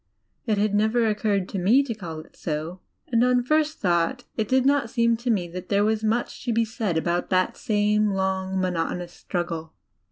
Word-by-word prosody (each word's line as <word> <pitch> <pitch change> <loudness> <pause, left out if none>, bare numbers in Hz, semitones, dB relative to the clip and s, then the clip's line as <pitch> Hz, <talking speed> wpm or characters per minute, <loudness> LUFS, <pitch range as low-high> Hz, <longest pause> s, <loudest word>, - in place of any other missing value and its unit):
It 215 -2 +2
had 205 0 +1
never 220 +3 +2
occurred 205 -3 0
to 195 - -3
me 225 +10 +4
to 260 -4 -3
call 170 -7 -7
it - - -19
so; 160 +3 -4 0.3
and, 235 -1 +3
on 250 0 +3
first 305 +3 +1
thought, 175 +7 +1
it 220 -2 -1
did 260 +2 +2
not 275 -4 +2
seem 235 -1 +2
xo 240 +1 -1
me 185 -6 0
that 180 +1 -8
there 200 0 +3
was 220 0 0
much 225 +3 -1
ra 235 - +2
be 230 0 +3
said 215 -6 -2
about 175 +2 -1
that 185 -1 +1
same 210 -1 +1
long, 190 -1 -1
monotonous 180 -1 -2
struggle. 165 -3 -4
210 Hz, 195 wpm, -25 LUFS, 180-230 Hz, 0.3 s, me